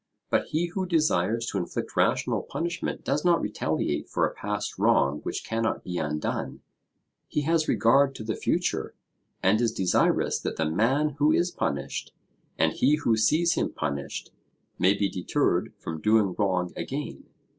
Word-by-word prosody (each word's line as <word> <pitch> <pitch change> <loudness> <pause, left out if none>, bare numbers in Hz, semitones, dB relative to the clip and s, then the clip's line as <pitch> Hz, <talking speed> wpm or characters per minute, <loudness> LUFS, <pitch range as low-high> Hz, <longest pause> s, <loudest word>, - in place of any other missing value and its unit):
But - - +2
he 160 +3 0
who 185 +2 -3
desires 115 - +1
to 100 - -2
inflict 90 - -4
rational - - +2
punishment 170 0 -4
does 140 +3 0
not 175 -2 +4
retaliate 105 - -2
for - - +1
a - - -3
past 105 0 -4
wrong 70 +2 +3
which - - -4
cannot 115 0 -1
be 90 -1 -3
undone; 75 0 -3 0.7
he 150 - -1
has 160 +1 +1
regard 135 +4 +4
to - - -6
the 110 0 -2
future, - - -1 0.5
and 105 +5 +4
is 115 -2 +2
desirous 95 -4 +2
that - - -4
the 80 - 0
man 115 - +2
who 150 +1 +4
is 175 +2 +2
punished, 70 - -3 0.4
and - - +2
he 140 +4 +3
who 120 -7 +1
sees 155 +11 +3
him - - -1
punished, 70 -1 -4 0.5
may 95 +2 +4
be 100 - +2
deterred 90 -2 0
from 80 -1 -6
doing 105 -3 +3
wrong 90 -4 0
again. - - -5
110 Hz, 160 wpm, -27 LUFS, 90-150 Hz, 0.7 s, not